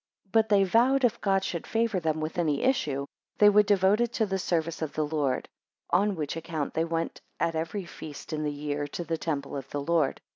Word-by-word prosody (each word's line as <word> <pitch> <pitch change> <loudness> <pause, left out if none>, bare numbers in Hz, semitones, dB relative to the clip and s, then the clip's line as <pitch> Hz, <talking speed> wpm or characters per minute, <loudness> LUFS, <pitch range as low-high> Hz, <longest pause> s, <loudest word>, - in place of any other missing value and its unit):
6 195 - -36
But 220 0 +3
they 200 -2 +5
vowed, 245 +8 +3
if 245 - +2
God 195 -1 +2
should 170 -3 -4
favour 225 -4 +1
them 160 -2 -1
with 155 +3 -3
any 150 -4 +1
issue, 145 - +1 0.3
they 210 - +7
would 205 0 +5
devote 200 +2 +4
it 240 -1 +1
to 220 - +1
the 195 -1 -2
service 165 -2 -1
of 155 -3 -3
the 155 - 0
Lord; 145 -4 -1 0.4
on 200 +3 +3
which 150 -3 -3
account 165 -3 -3
they 160 - +1
went 165 0 -3 0.2
at 165 - +1
every 165 +5 -3
feast 155 -2 -9
in 155 - -1
the 150 -1 -1
year 145 0 -3
to 175 - -5
the 165 0 -3
temple 140 -4 -3
of 135 -1 -6
the 145 - -3
Lord. 160 -3 +1
165 Hz, 225 wpm, -28 LUFS, 150-200 Hz, 0.4 s, they